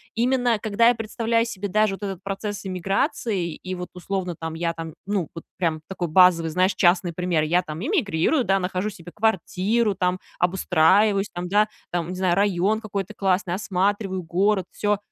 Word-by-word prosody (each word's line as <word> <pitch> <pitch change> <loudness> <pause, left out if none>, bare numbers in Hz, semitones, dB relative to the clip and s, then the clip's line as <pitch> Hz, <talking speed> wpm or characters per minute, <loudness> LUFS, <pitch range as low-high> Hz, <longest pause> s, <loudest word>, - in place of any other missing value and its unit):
именно 245 -1 +2
когда 220 +3 +3
я 245 - +2
представляю 230 +1 0
себе 205 -3 -5
даже 215 0 +2
вот 200 - -13
этот 195 -3 -5
процесс 205 +1 -4
иммиграции, 190 - -1
и 185 0 -6
вот, 180 0 -6
условно, 180 -1 -3
там, 160 -1 -4
я 170 0 -1
там, 165 -1 -7
ну, 195 -5 -1
вот 165 - -8
прям 165 -3 0
такой 180 -3 -4
базовый, 170 -1 +5
знаешь, 185 +3 +2
частный 175 -1 +3
пример: 175 -2 0
я 170 +4 +2
там 155 0 -7
иммигрирую, 270 - +1
да, 195 +1 +2
нахожу 185 +2 -2
себе 175 -3 -11
квартиру 210 +1 +1
там, 180 0 0 0.2
обустраиваюсь 190 +3 +3
там, 175 0 -4
да, 210 +2 +3 0.2
там, 175 -1 -2
не 185 - -4
знаю, 180 -1 +1
район 200 +2 +1
какой-то 200 -2 -4
классный, 190 -2 0
осматриваю 195 -1 -1
город, 190 +4 +1
всё. 210 0 0
190 Hz, 175 wpm, -24 LUFS, 175-210 Hz, 0.2 s, базовый